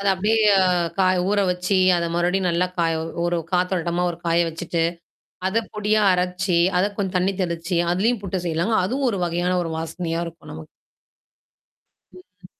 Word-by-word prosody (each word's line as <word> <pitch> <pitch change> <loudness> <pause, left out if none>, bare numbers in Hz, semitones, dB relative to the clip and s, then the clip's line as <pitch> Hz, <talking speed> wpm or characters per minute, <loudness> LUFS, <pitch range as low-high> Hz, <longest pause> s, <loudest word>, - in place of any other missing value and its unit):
அத 200 - -3
அப்படியே 210 +4 +1 0.6
காய 185 -1 +3
ஊற 205 -1 +2
வச்சு 180 +2 0 0.2
அத 170 0 -1
மறுபடியும் 180 +1 +1
நல்லா 175 +2 +1
காய 165 -1 +1 0.3
ஒரு 175 0 0 0.2
காத்தோழுட்டமா 180 -1 0
ஒரு 165 - -6
காய 170 +1 +3
வச்சுட்டு 165 +1 -3 0.6
அத 205 +4 +1 0.2
பொடியா 210 0 +1
அரைச்சு, 180 0 0 0.2
அத 185 - +3
கொஞ்சம் 190 -3 -2
தண்ணி 190 +2 +1
தெளிச்சு, 170 0 -2
அததுலயும் 210 +5 +1
புட்டு 190 -1 -3
செய்யலாங்க. 170 +7 0
அதுவும் 260 +7 -1
ஒரு 200 - -3
வகையான 175 +2 0
ஒரு 165 - -4
வாசனையா 165 +1 -3
இருக்கும் 165 0 -11
நமக்கு. 80 0 -10 1.4
ம். 185 0 -17
180 Hz, 150 wpm, -22 LUFS, 170-190 Hz, 1.4 s, காய